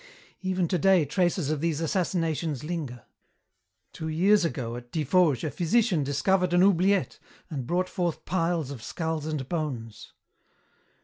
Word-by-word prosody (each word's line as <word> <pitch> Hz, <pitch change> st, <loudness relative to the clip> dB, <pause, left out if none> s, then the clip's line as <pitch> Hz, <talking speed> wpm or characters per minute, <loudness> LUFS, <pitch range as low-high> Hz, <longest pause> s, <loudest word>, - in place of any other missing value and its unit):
"Even 185 Hz, -2 st, 0 dB
today 180 Hz, -1 st, +3 dB
traces 175 Hz, 0 st, 0 dB
of 155 Hz, -2 st, -2 dB
these 165 Hz, -2 st, 0 dB
assassinations 165 Hz, -4 st, -1 dB
linger. 150 Hz, -7 st, -5 dB, 0.9 s
Two 160 Hz, -, -5 dB
years 185 Hz, +6 st, +3 dB
ago 125 Hz, -7 st, -2 dB
at 120 Hz, 0 st, -10 dB
Tiffauges 155 Hz, -3 st, +2 dB
a 155 Hz, -, -2 dB
physician 175 Hz, -, +2 dB
discovered 180 Hz, +6 st, +1 dB
an 175 Hz, -, +5 dB
oubliette 195 Hz, 0 st, +2 dB, 0.3 s
and 135 Hz, -5 st, -4 dB
brought 180 Hz, +3 st, 0 dB
forth 175 Hz, -4 st, -3 dB
piles 165 Hz, -4 st, 0 dB
of 130 Hz, -5 st, -7 dB
skulls 160 Hz, +4 st, -3 dB
and 150 Hz, -5 st, -3 dB
bones. 130 Hz, -10 st, -5 dB
165 Hz, 135 wpm, -27 LUFS, 145-180 Hz, 0.9 s, an